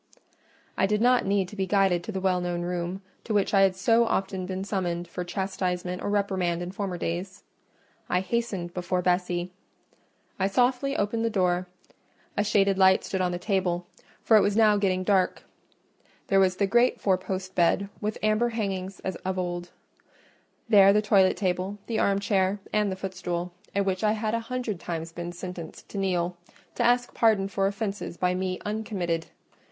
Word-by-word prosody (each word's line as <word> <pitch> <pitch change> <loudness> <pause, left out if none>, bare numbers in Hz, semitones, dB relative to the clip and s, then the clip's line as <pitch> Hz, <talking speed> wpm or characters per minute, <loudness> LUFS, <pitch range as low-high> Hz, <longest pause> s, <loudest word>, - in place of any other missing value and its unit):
I 195 - +3
did 210 +1 +1
not 245 -1 +3
need 195 -2 +1
to - - -10
be 190 -2 -1
guided 190 -3 +2
to 220 - -5
the 190 - -3
well 185 -1 +1
known 175 -1 -2
room, 180 +2 -3 0.2
to 220 - -2
which 200 0 +1
I 195 - +5
had 190 -1 +4
so 230 +5 +3
often 190 -3 -1
been 190 0 -3
summoned 175 -4 -2
for 180 +1 -5
chastisement 180 -1 -3
or - - -2
reprimand 190 -4 0
in 175 - -5
former 190 -2 -3
days. 180 +4 -4 0.7
I 180 - +2
hastened 195 -5 -2
before 180 0 -1
Bessie; 180 0 0 0.9
I 190 - +2
softly 250 +6 +1
opened 220 +3 0
the 230 - +2
door: 180 -3 +1 0.7
a 205 - +2
shaded 200 -2 +2
light 190 0 +5
stood 190 - -2
on 180 -1 +1
the 175 - -2
table, 180 -2 -1 0.4
for 225 - +5
it - - +6
was 205 +1 +1
now 215 -2 +6
getting 190 -2 +1
dark. 190 -1 +1 0.9
There 195 - +4
was 185 -1 +3
the 200 - +1
great 240 +5 +3
four 190 -2 +3
post 185 0 -5
bed 185 +3 +2
with 210 0 -2
amber 215 +3 +2
hangings 195 -4 -3
as 190 -2 -4
of 190 0 -4
old; 175 -1 -3 1.0
there 200 -3 +7
the 210 +1 +3
toilet 195 -3 +4
table, 185 +1 -1
the 225 -2 -2
armchair, 200 0 +1
and 210 -2 +2
the - - -2
footstool, 180 -2 -4 0.2
at 200 0 +2
which 190 0 -1
I 215 0 +3
had 215 0 -2
a 230 - +1
hundred 230 -4 -4
times 165 -1 -5
been 175 +1 -6
sentenced 175 -2 -8
to 200 - -5
kneel, 180 -2 0 0.4
to - - -4
ask 245 0 +2
pardon 215 -4 +3
for 195 0 +1
offences 200 -3 -4
by 180 0 +1
me 185 0 -2
uncommitted. 200 -6 -2
190 Hz, 180 wpm, -27 LUFS, 180-205 Hz, 1.0 s, there